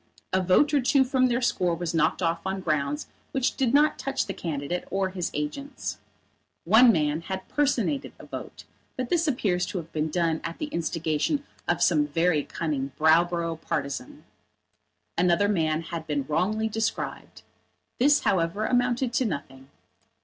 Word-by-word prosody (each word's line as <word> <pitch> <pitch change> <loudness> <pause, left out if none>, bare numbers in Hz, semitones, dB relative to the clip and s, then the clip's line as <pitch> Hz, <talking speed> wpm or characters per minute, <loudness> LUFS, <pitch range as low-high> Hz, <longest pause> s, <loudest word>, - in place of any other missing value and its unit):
A 185 - +3
vote 185 - +3
or 285 - +4
two 265 +2 +4
from 255 0 +2
their 245 0 0
score 180 -6 +1
was 170 -1 -3
knocked 165 +3 +1
off 165 0 +1
on 190 0 -2
grounds 150 -3 -1 0.3
which 265 -2 0
did 260 -4 +1
not 295 +3 +4
touch 275 0 -1
the 195 - -4
candidate 165 0 -3
or 195 0 0
his 180 -2 -2
agents. 150 - -4 0.6
One 225 +7 +7
man 150 -3 0
had 190 +2 -5
personated 285 -1 0
a - - -12
vote, - - -8 0.3
but 255 -2 -3
this 335 -2 +2
appeared 205 -10 +1
to 180 - -2
have 165 -2 -6
been 155 0 -1
done 165 -1 0
at 165 0 -5
the 305 - -4
instigation 165 - -1 0.2
of - - +2
some 150 -4 +3
very 165 +1 +2
cunning 140 -4 -3
Browborough 165 +1 +2
partisan. 140 -2 -4 1.0
Another 180 +3 +3
man 160 -5 +1
had 165 -1 -6
been 145 -3 -1
wrongly 205 +8 0
described. 220 0 -3 0.6
This, 285 +3 +5
however, 185 +4 +1
amounted 245 0 +1
to 255 - +2
nothing. 135 - -5
180 Hz, 160 wpm, -26 LUFS, 160-240 Hz, 1.0 s, One